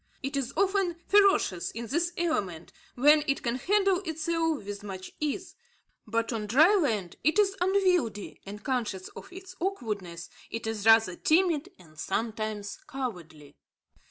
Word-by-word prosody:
It 270 Hz, +2 st, -3 dB
is 275 Hz, -2 st, -2 dB
often 385 Hz, -3 st, +2 dB
ferocious 395 Hz, -, +3 dB
in 235 Hz, +1 st, -6 dB
this 335 Hz, +8 st, 0 dB
element, 200 Hz, -, -2 dB, 0.2 s
where 295 Hz, +4 st, +5 dB
it 275 Hz, -, 0 dB
can 235 Hz, 0 st, -1 dB
handle 390 Hz, +5 st, +2 dB
itself 325 Hz, -, -1 dB
with 205 Hz, 0 st, -6 dB
much 190 Hz, -2 st, -7 dB
ease; 305 Hz, +5 st, -3 dB, 0.5 s
but 230 Hz, +2 st, -1 dB
on 215 Hz, -2 st, -3 dB
dry 305 Hz, -, +6 dB
land 225 Hz, -, 0 dB
it 310 Hz, +7 st, +2 dB
is 395 Hz, -2 st, +3 dB
unwieldy, 360 Hz, -, +1 dB
and, 205 Hz, +1 st, -9 dB
conscious 225 Hz, -8 st, -2 dB
of -, -, -12 dB
its 375 Hz, 0 st, -10 dB
awkwardness, 210 Hz, -, -4 dB, 0.2 s
it 230 Hz, 0 st, -5 dB
is 220 Hz, -1 st, -2 dB
rather 225 Hz, -5 st, +6 dB
timid 335 Hz, -, +2 dB
and 155 Hz, -4 st, -17 dB
sometimes 215 Hz, -1 st, -3 dB
cowardly. 170 Hz, -, -6 dB
255 Hz, 145 wpm, -28 LUFS, 210-345 Hz, 0.5 s, dry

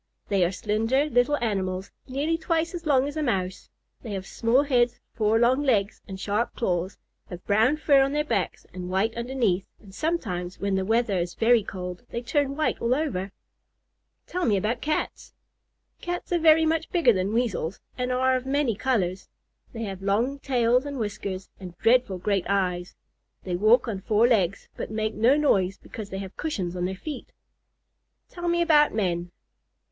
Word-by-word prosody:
"They 195 Hz, -3 st, +3 dB
are 175 Hz, -, +2 dB
slender 225 Hz, +8 st, +1 dB
little 270 Hz, +1 st, +2 dB
animals, 190 Hz, -3 st, -2 dB, 0.2 s
nearly 285 Hz, +5 st, 0 dB
twice 330 Hz, +1 st, -1 dB
as 340 Hz, -2 st, -6 dB
long 275 Hz, -2 st, +3 dB
as 290 Hz, -, -6 dB
a 310 Hz, -, -1 dB
Mouse. 190 Hz, -9 st, -2 dB, 0.3 s
They 220 Hz, -, -6 dB
have 190 Hz, -1 st, -4 dB
small 235 Hz, +7 st, +2 dB
heads, 245 Hz, -4 st, +2 dB
four 220 Hz, 0 st, +2 dB
short 245 Hz, +3 st, +4 dB
legs, 220 Hz, -8 st, +1 dB
and 190 Hz, -2 st, -7 dB
sharp 210 Hz, +4 st, -1 dB
claws; 180 Hz, -3 st, -1 dB, 0.3 s
have 180 Hz, -1 st, -9 dB
brown 225 Hz, +8 st, +3 dB
fur 285 Hz, -3 st, +4 dB
on 270 Hz, 0 st, +2 dB
their 300 Hz, +1 st, +1 dB
backs 300 Hz, -, -2 dB
and 180 Hz, -1 st, -6 dB
white 195 Hz, +5 st, 0 dB
underneath, 235 Hz, -6 st, 0 dB
and 195 Hz, -3 st, -16 dB
sometimes, 190 Hz, -, -2 dB
when 200 Hz, 0 st, -1 dB
the 190 Hz, 0 st, 0 dB
weather 225 Hz, -3 st, +1 dB
is 175 Hz, 0 st, -3 dB
very 235 Hz, 0 st, +4 dB
cold, 180 Hz, -1 st, -6 dB
they 235 Hz, -, -4 dB
turn 280 Hz, +2 st, 0 dB
white 310 Hz, +1 st, -1 dB
all 235 Hz, +2 st, +2 dB
over." 205 Hz, -11 st, -2 dB, 0.9 s
"Tell 365 Hz, 0 st, -3 dB
me 210 Hz, -8 st, +3 dB
about 220 Hz, +5 st, -1 dB
Cats." 305 Hz, +1 st, -3 dB, 0.7 s
"Cats 350 Hz, 0 st, -4 dB
are 350 Hz, -, +2 dB
very 320 Hz, 0 st, +6 dB
much 320 Hz, 0 st, 0 dB
bigger 330 Hz, -10 st, +4 dB
than 190 Hz, +1 st, -1 dB
Weasels, 220 Hz, -7 st, -1 dB, 0.2 s
and 250 Hz, 0 st, -2 dB
are 260 Hz, +1 st, +2 dB
of 255 Hz, 0 st, -3 dB
many 275 Hz, -3 st, +1 dB
colors. 195 Hz, -6 st, -1 dB, 0.4 s
They 230 Hz, -1 st, -5 dB
have 195 Hz, -3 st, -5 dB
long 230 Hz, +8 st, 0 dB
tails 250 Hz, -2 st, +2 dB
and 285 Hz, -1 st, -5 dB
whiskers, 200 Hz, -4 st, -4 dB
and 180 Hz, -3 st, -9 dB
dreadful 235 Hz, -5 st, +3 dB
great 195 Hz, 0 st, -1 dB
eyes. 180 Hz, -2 st, -1 dB, 0.5 s
They 180 Hz, -2 st, -2 dB
walk 215 Hz, +7 st, +4 dB
on 200 Hz, -4 st, -3 dB
four 215 Hz, +4 st, +3 dB
legs, 200 Hz, -5 st, +1 dB
but -, -, -5 dB
make 215 Hz, 0 st, -2 dB
no 235 Hz, +7 st, +4 dB
noise 195 Hz, -10 st, +2 dB
because 215 Hz, -3 st, -9 dB
they 190 Hz, -, -5 dB
have 195 Hz, -1 st, -7 dB
cushions 190 Hz, -, -3 dB
on 180 Hz, 0 st, -1 dB
their 190 Hz, +1 st, -3 dB
feet." 290 Hz, +7 st, -7 dB, 1.0 s
"Tell 350 Hz, -1 st, -5 dB
me 345 Hz, 0 st, +2 dB
about 300 Hz, -6 st, +4 dB
men." 175 Hz, -4 st, -1 dB
225 Hz, 180 wpm, -26 LUFS, 190-275 Hz, 1.0 s, very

